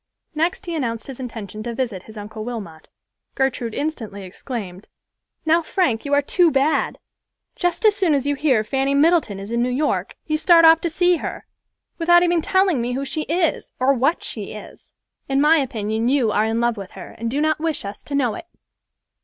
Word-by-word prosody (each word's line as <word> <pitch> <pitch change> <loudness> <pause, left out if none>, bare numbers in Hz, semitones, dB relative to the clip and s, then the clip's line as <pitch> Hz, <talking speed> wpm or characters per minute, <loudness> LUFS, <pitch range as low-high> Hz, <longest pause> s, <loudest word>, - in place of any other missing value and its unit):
Next 325 +4 -1
he 345 - -4
announced 230 -7 -2
his 270 -2 -9
intention 220 -5 -7
to 235 +1 -5
visit 230 -7 -2
his 220 - -11
Uncle 215 +1 -7
Wilmot. 200 -10 -7 0.5
Gertrude 250 -4 -1
instantly 225 -10 -4
exclaimed, 190 -1 -7 0.6
"Now, 325 +2 +4
Frank, 305 - 0
you 285 - -2
are 285 - +3
too 350 +4 +3
bad. 280 +1 +1 0.6
Just 355 +4 -1
as 425 -1 +5
soon 360 -7 +2
as 275 -1 -1
you 285 - +1
hear 270 -6 +2
Fanny 270 +4 0
Middleton 300 - +3
is 200 +3 -8
in 235 0 0
New 245 - +1
York, 290 +4 -1
you 310 -1 -1
start 335 0 +6
off 325 0 +7
to 340 - -1
see 355 +2 +2
her, - - -6 0.5
without 345 +1 +5
even 345 -1 +2
telling 375 -6 +2
me 245 +1 -2
who 275 +2 -2
she 305 +3 -4
is, 335 0 0
or 260 +2 +4
what 275 +6 +1
she - - -5
is. - - -12 0.4
In 270 0 +2
my 305 +3 +5
opinion 220 -3 -2
you 255 -4 +2
are 210 - +2
in 225 +1 0
love 235 -1 +1
with 195 -2 -7
her, - - -9
and 230 0 -2
do 275 +5 -1
not 310 0 +1
wish 315 -7 -2
us 200 +1 -7
to 285 - -4
know 250 -6 +1
it." 330 - -9
270 Hz, 205 wpm, -21 LUFS, 225-320 Hz, 0.6 s, off